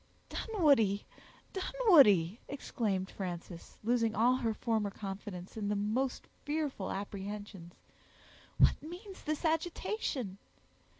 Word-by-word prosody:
"Dunwoodie! 280 - +2 0.5
Dunwoodie!" 280 - +5
exclaimed 205 -8 -2
Frances, 175 -2 -6
losing 230 -1 +2
all 245 +4 +4
her 235 -3 0
former 220 -1 0
confidence 195 -2 -7
in 210 -2 -2
the 205 - +1
most 220 +6 -1 0.2
fearful 290 -9 -2
apprehensions, 200 -2 -6 0.8
"what - - +5
means 360 +5 -9
this 310 +2 -2
agitation?" 315 - -1
220 Hz, 100 wpm, -33 LUFS, 195-295 Hz, 0.8 s, Dunwoodie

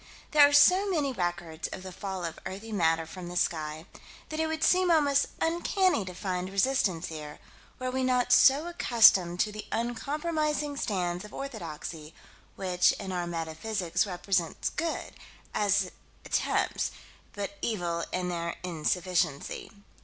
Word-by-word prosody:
There 290 -2 +7
are - - -4
so 365 +8 +6
many 295 -7 0
records 175 -4 -3
of 185 - -8
the 185 - -7
fall 190 -1 -5
of 165 - -6
earthy 200 +4 -7
matter 165 -5 +2
from 175 +2 -8
the 175 0 -5
sky 155 -2 -1 0.4
that 310 - -4
it 320 - +1
would 315 0 -2
seem 365 0 +4
almost 285 -4 +4
uncanny 345 - +1
to 180 -1 -8
find 185 -1 -3
resistance 195 -5 +1
here, 150 -2 -7 0.4
were 255 0 -3
we 260 0 -1
not 250 -1 +2
so 285 +4 +6
accustomed 215 - +5
to 215 - 0
the 210 0 -8
uncompromising 295 +5 -1
stands 180 -7 -2
of 210 - -11
orthodoxy 165 - -7 0.4
which, 180 -2 +2
in 190 - -6
our 175 -1 -2
metaphysics, 175 +3 -2
represent 180 -2 -1
good, 330 +1 -3 0.4
as 200 -2 +2 0.3
attempts, - - 0 0.4
but 200 0 -5
evil 175 -6 -1
in 180 0 -1
their 170 -1 -3
insufficiency. 170 -2 -1
190 Hz, 145 wpm, -29 LUFS, 175-275 Hz, 0.4 s, There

